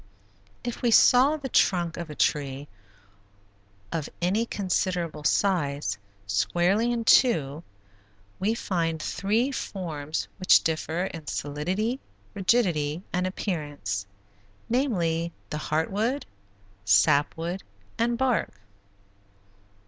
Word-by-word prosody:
If 240 -1 -4
we 240 - +2
saw 255 +6 +6
the 280 -3 -5
trunk 175 -8 +2
of 170 -2 -6
a 150 - -7
tree, 140 -1 0 1.2
of 160 -3 -3
any 200 +7 +1
considerable 180 -6 -1
size, 150 - +1 0.3
squarely 180 - +1
in 235 -1 -1
two, 160 - +4 0.8
we 215 +4 +1
find 165 -7 -1
three 220 - 0
forms 160 - -4
which 185 - +5
differ 160 +2 -1
in 165 -5 -7
solidity, 185 - -2 0.3
rigidity, 180 -7 +1
and 180 +1 +1
appearance; 145 - -3 0.6
namely, 170 - 0 0.2
the 150 - -2
heart 155 +3 -1
wood, 230 +8 -1 0.6
sap 145 +6 +4
wood, 175 +4 -3 0.4
and 235 +1 +1
bark. 255 -2 +1
175 Hz, 105 wpm, -26 LUFS, 155-220 Hz, 1.2 s, saw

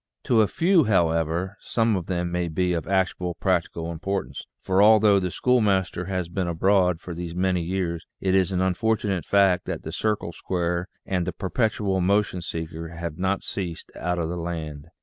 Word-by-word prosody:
To 115 -3 +4
a 105 - +3
few, 170 - +3
however, 85 0 +1
some 115 -2 +1
of 90 -3 -3
them 90 -2 -1
may 90 0 -1
be 90 +2 0
of 85 -3 -3
actual 95 -2 0
practical 85 -2 -1
importance, 95 +4 -3 0.2
for 95 +1 +2
although 105 -1 +6
the 90 -1 -1
schoolmaster 100 -6 +1
has 90 -2 -2
been 90 +1 -2
abroad 90 0 +2
for 90 0 -7
these 85 0 -6
many 90 -1 +1
years, 85 -1 -3
it 95 -1 0
is 95 0 +3
an 90 -1 0
unfortunate 95 -1 0
fact 95 -3 +3
that - - -4
the - - -5
circle 105 -5 -1
squarer 90 0 -2 0.2
and 90 -2 -1
the - - 0
per 90 +2 -6
petual 105 -5 +1
motion 100 0 +1
seeker 80 -1 -5
have 85 -1 -6
not 95 +1 0
ceased 90 -4 -5
out 90 +2 -2
of 85 -2 -1
the 90 +2 -4
land. 80 -3 -5
90 Hz, 185 wpm, -25 LUFS, 85-100 Hz, 0.2 s, although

